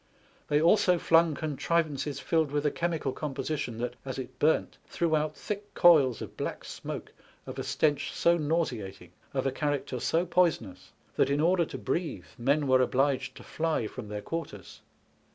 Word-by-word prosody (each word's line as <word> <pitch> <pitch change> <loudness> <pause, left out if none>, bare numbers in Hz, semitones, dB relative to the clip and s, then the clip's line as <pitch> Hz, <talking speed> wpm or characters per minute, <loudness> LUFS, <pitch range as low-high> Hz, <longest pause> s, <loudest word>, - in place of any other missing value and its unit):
They 145 - +3
also 180 +2 +4
flung 165 -2 +4
contrivances 150 -1 -1
filled 160 -3 +1
with 145 +1 -1
a 150 - +3
chemical 165 -5 -1
composition 140 -4 -3
that, 120 +1 -3
as 130 -1 -5
it 130 -2 -7
burnt, 155 +2 +1
threw 165 -2 0
out 155 0 -1
thick 205 0 -6
coils 150 -9 +5
of - - -10
black - - -4
smoke - - -7 0.3
of - - -7
a - - -2
stench 150 -2 0
so 170 0 +3
nauseating, 125 - -2 0.2
of 130 -1 -2
a 135 - +2
character 145 -2 -2
so 165 +8 +1
poisonous 170 - 0 0.3
that, - - +3
in 140 +1 +1
order 170 +2 +3
to - - -7
breathe, 160 - -3
men 140 +5 +2
were 130 0 +5
obliged 135 +1 +1
to - - -11
fly 160 -7 -1
from 110 +1 -7
their 105 0 -5
quarters. 165 0 -6
150 Hz, 170 wpm, -29 LUFS, 130-165 Hz, 0.3 s, coils